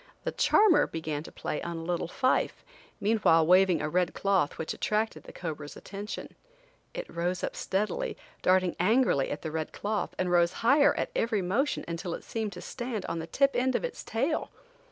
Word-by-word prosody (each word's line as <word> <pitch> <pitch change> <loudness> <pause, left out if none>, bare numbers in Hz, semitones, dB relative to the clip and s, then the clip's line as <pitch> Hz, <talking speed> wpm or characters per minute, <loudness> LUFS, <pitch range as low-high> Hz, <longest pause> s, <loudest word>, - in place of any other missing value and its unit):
The - - -1
"charmer" 415 -7 +4
began 155 -2 -4
to 160 - -10
play - - -4
on 170 -1 -4
a 165 - -5
little 170 0 -1
fife, 255 +9 0 0.4
meanwhile 200 -7 +4
waving 180 -1 +5
a - - 0
red 180 +2 0
cloth 195 -7 +1
which 160 - -3
attracted 215 +1 -1
the - - -10
cobra's 150 -4 -6
attention. 205 +2 -7 0.6
It - - -4
rose 175 +1 -2
up - - -2
steadily, 195 0 -1 0.2
darting 185 -1 +3
angrily 210 - +3
at 145 - -5
the 160 - -3
red 155 0 -3
cloth, 210 0 -3
and 180 -1 0
rose 175 0 +4
higher 285 +4 +5
at - - -2
every 220 -4 +1
motion 235 +11 0
until 170 +1 -3
it - - -10
seemed 220 -3 -3
to 180 - -8
stand 240 -5 -4
on 165 - -3
the 160 - -5
tip 275 +8 +3
end 255 +1 +1
of - - 0
its - - -6
tail. 270 +8 -1
185 Hz, 190 wpm, -29 LUFS, 170-225 Hz, 0.6 s, waving